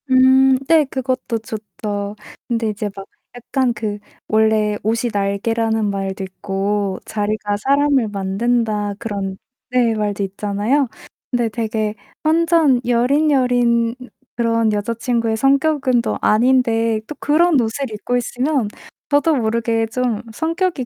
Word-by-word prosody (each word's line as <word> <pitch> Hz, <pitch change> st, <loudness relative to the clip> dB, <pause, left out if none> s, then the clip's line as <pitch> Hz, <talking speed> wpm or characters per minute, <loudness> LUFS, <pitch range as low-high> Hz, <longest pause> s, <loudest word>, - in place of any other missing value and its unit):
음 260 Hz, +1 st, +6 dB, 0.2 s
네 320 Hz, -2 st, +5 dB
그것도 255 Hz, -3 st, -2 dB
좋죠. 210 Hz, -2 st, -5 dB, 0.3 s
근데 230 Hz, -2 st, 0 dB
이제 210 Hz, 0 st, -3 dB
막 195 Hz, -, -8 dB, 0.3 s
약간 245 Hz, +1 st, -1 dB
그 215 Hz, -2 st, -4 dB, 0.3 s
원래 215 Hz, -1 st, +2 dB
"옷이 225 Hz, +2 st, 0 dB
날개."라는 215 Hz, +2 st, 0 dB
말도 195 Hz, 0 st, -3 dB
있고 195 Hz, +1 st, -2 dB
"자리가 210 Hz, -1 st, -2 dB
사람을 275 Hz, 0 st, +2 dB
만든다." 205 Hz, +1 st, -1 dB
그런 200 Hz, -4 st, -4 dB, 0.3 s
네 245 Hz, -3 st, +2 dB
말도 205 Hz, -1 st, -1 dB
있잖아요. 205 Hz, +8 st, 0 dB, 0.4 s
근데 240 Hz, -2 st, +1 dB
되게 220 Hz, -1 st, -2 dB, 0.3 s
완전 320 Hz, -4 st, +3 dB
여린, 255 Hz, +6 st, +2 dB
여린 245 Hz, -3 st, +2 dB, 0.4 s
그런 230 Hz, -2 st, +1 dB
여자 205 Hz, +3 st, -1 dB
친구의 230 Hz, -1 st, -1 dB
성격은 270 Hz, -1 st, +2 dB
또 -, -, -2 dB
아닌데 230 Hz, -1 st, +3 dB
또 300 Hz, -, -7 dB
그런 310 Hz, +1 st, +3 dB
옷을 240 Hz, +3 st, -1 dB
입고 215 Hz, +4 st, -2 dB
있으면 250 Hz, +1 st, -1 dB, 0.4 s
저도 295 Hz, +2 st, +3 dB
모르게 225 Hz, -1 st, 0 dB
좀 235 Hz, -2 st, -1 dB
성격이 330 Hz, -1 st, -1 dB
230 Hz, 255 characters per minute, -19 LUFS, 210-260 Hz, 0.4 s, 음